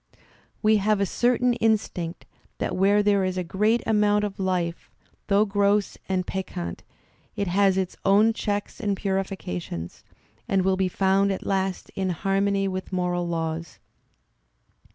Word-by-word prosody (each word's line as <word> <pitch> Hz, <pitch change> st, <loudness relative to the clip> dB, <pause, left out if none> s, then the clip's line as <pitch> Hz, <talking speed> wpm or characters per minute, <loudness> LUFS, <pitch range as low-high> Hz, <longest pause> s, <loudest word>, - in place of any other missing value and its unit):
"We 215 Hz, 0 st, +5 dB
have 210 Hz, 0 st, +2 dB
a 200 Hz, -, +2 dB
certain 245 Hz, +4 st, +2 dB
instinct 215 Hz, -7 st, -1 dB, 0.3 s
that -, -, -2 dB
where 200 Hz, +2 st, +3 dB
there 200 Hz, -1 st, +3 dB
is 185 Hz, 0 st, -1 dB
a 180 Hz, -, 0 dB
great 210 Hz, +7 st, +1 dB
amount 210 Hz, -1 st, +3 dB
of 205 Hz, -2 st, -4 dB
life, 180 Hz, -3 st, -2 dB, 0.4 s
though 205 Hz, +1 st, +4 dB
gross 200 Hz, 0 st, +1 dB
and 185 Hz, -1 st, 0 dB
peccant, 90 Hz, -, -5 dB, 0.5 s
it 200 Hz, -, -1 dB
has 190 Hz, +1 st, +3 dB
its 185 Hz, -1 st, -1 dB
own 210 Hz, +3 st, +4 dB
checks 205 Hz, 0 st, -3 dB
and 205 Hz, -4 st, -1 dB
purifications, 190 Hz, -, -4 dB, 0.4 s
and 195 Hz, -1 st, +2 dB
will 190 Hz, 0 st, +2 dB
be 190 Hz, -1 st, 0 dB
found 195 Hz, +2 st, +2 dB
at 190 Hz, -, -4 dB
last 190 Hz, -1 st, -1 dB
in 190 Hz, -1 st, -2 dB
harmony 195 Hz, +2 st, 0 dB
with 185 Hz, 0 st, -4 dB
moral 180 Hz, -1 st, -1 dB
laws.'' 165 Hz, 0 st, -3 dB
195 Hz, 145 wpm, -25 LUFS, 185-205 Hz, 0.5 s, We